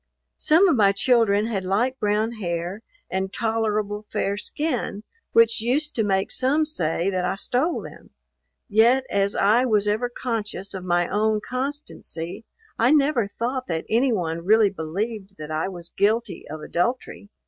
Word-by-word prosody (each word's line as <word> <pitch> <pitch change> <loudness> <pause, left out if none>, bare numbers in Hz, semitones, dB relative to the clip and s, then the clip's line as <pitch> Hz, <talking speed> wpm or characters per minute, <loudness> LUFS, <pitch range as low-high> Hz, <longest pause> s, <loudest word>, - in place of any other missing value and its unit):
Some 330 +6 +5
of 335 - +3
my 200 -4 +4
children 215 -2 +3
had 210 -4 -2
light 235 +8 0
brown 210 +2 +1
hair, 180 -2 -4 0.3
and 190 0 -2
tolerable 215 -2 -1
fair 200 -2 -1
skin, 245 -2 -2 0.3
which 230 -1 +4
used 290 +6 0
to 225 - 0
make 195 -2 0
some 285 +4 +3
say 180 - -1
that 185 -1 -1
I 180 - 0
stole 255 - -1
them; - - -12 0.6
yet 235 +4 +4
as 200 0 +1
I 215 +5 +4
was 210 -4 +2
ever 220 +4 0
conscious 220 -5 -4
of 190 -2 -6
my 175 -1 +1
own 215 +1 +1
constancy, 255 - -5 0.3
I 235 - +4
never 280 -7 +3
thought 255 +2 -2
that 165 -2 -3
any 245 +4 +3
one 170 -5 -2
really 210 +1 +4
believed 195 +4 -5
that 155 0 -7
I 155 +3 -1
was 175 -3 -8
guilty 210 -1 0
of 155 +1 -7
adultery. 205 +4 -2
215 Hz, 160 wpm, -24 LUFS, 190-240 Hz, 0.6 s, Some